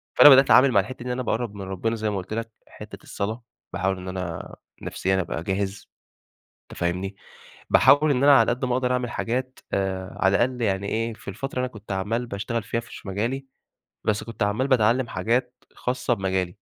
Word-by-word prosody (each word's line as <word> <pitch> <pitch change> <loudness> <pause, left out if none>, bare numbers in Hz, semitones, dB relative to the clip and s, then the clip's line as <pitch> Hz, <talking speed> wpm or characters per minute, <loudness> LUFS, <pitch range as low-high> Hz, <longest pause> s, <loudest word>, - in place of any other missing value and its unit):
فأنا 145 - +10
بدأت 135 0 +9
أتعامل 130 +1 +6
مع 100 - +4
الحتّة 110 +7 -3
دي - - -12
إن - - -1
أنا 125 +1 -2
باقرب 115 -2 -2
من 100 - -7
ربنا 95 +4 -2
زي 110 -1 -2
ما 100 - -2
قُلت 95 +3 -6
لَك 115 0 -4 0.2
حتّة - - -11
الصلاة 110 +4 -4 0.3
باحاول 95 0 0
إن 90 0 -8
أنا 90 -3 -5 0.3
نفسيًا 95 0 0
أبقى 85 -1 -4
جاهز 95 +1 -3 0.8
أنت - - -13
فاهمني، 90 +3 -2 0.5
باحاول 150 +1 +6
إن 135 0 +2
أنا 145 -1 +8
على 115 - +3
قد 125 +2 -1
ما 125 - 0
أقدر 125 0 +1
أعمل 125 -1 -1
حاجات 130 +2 -3
آآ 95 -1 -2
على 95 +1 +4
الأقل 125 0 0
يعني 100 -1 0
إيه، 115 0 -1
في - - -14
الفترة 130 +6 -5
أنا 130 - 0
كنت 105 -4 -9
عمّال 110 +6 -1
باشتغل 105 +2 -3
فيها 115 +2 -2
في 115 - -13
ش - - -11
مجالي، 120 +8 -2 0.6
بس 105 0 0
كنت 115 -2 -4
عمّال 110 +7 0
باتعلّم 120 0 +3
حاجات 125 +2 -1 0.2
خاصّة 125 -1 -1
بمجالي. 95 -3 -1
110 Hz, 200 wpm, -24 LUFS, 95-125 Hz, 0.8 s, فأنا